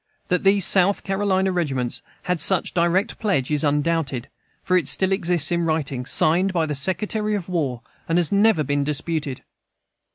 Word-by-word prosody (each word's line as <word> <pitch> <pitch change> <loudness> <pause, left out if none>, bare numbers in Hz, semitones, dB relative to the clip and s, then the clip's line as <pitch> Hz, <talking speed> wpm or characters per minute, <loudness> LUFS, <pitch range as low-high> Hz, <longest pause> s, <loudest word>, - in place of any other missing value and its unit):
That 180 - +1
these 195 -1 +4
South 195 +1 +3
Carolina 195 -1 0
regiments 135 -9 -2 0.2
had 180 -1 -1
such 185 +3 +2
direct 180 +6 0
pledge 170 - -1
is 150 +1 +2
undoubted, 145 -3 -1 0.3
for 185 - 0
it 170 -7 +1
still 190 0 0
exists 175 -5 +1
in 170 0 0
writing, 145 -6 -2
signed 180 +7 +3
by 165 -3 +1
the 150 - -3
Secretary 210 +8 -1
of 190 -4 -5
War, 145 -10 -2 0.3
and 165 - +2
has 175 -3 +1
never 200 -4 +3
been 145 0 -1
disputed. 150 -1 -3
170 Hz, 165 wpm, -22 LUFS, 145-190 Hz, 0.3 s, these